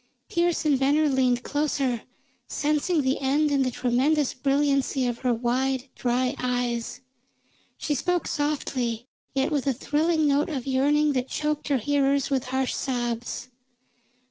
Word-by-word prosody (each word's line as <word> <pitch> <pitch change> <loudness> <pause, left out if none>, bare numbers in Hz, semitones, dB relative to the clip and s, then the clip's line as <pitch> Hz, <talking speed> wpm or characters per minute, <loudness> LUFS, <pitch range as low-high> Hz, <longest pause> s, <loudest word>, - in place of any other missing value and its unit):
Pearse 340 -1 +1
and 285 -3 +3
Venner 290 +3 +3
leaned 255 -3 +2
closer, 280 -5 -1 0.5
sensing 300 +2 0
the 260 +1 +1
end 290 +3 +1
in 280 -1 +2
the 260 - +2
tremendous 260 +4 +1
brilliancy 275 -1 +1
of 240 -1 -2
her 255 -1 +1
wide, 255 +3 0
dry 250 +1 0
eyes. 245 -1 -2 0.8
She 295 - -1
spoke 355 +5 0
softly, 255 -6 -2 0.3
yet 270 +4 +1
with 285 -2 -1
a 270 - +3
thrilling 310 +4 +1
note 285 +2 +2
of 270 -6 -4
yearning 290 +3 +2
that 255 -1 -1
choked 300 +1 -2
her 280 -2 +2
hearers 280 +2 +1
with 265 -2 0
harsh 260 0 -1
sobs. 240 -1 -3
270 Hz, 145 wpm, -25 LUFS, 250-295 Hz, 0.8 s, and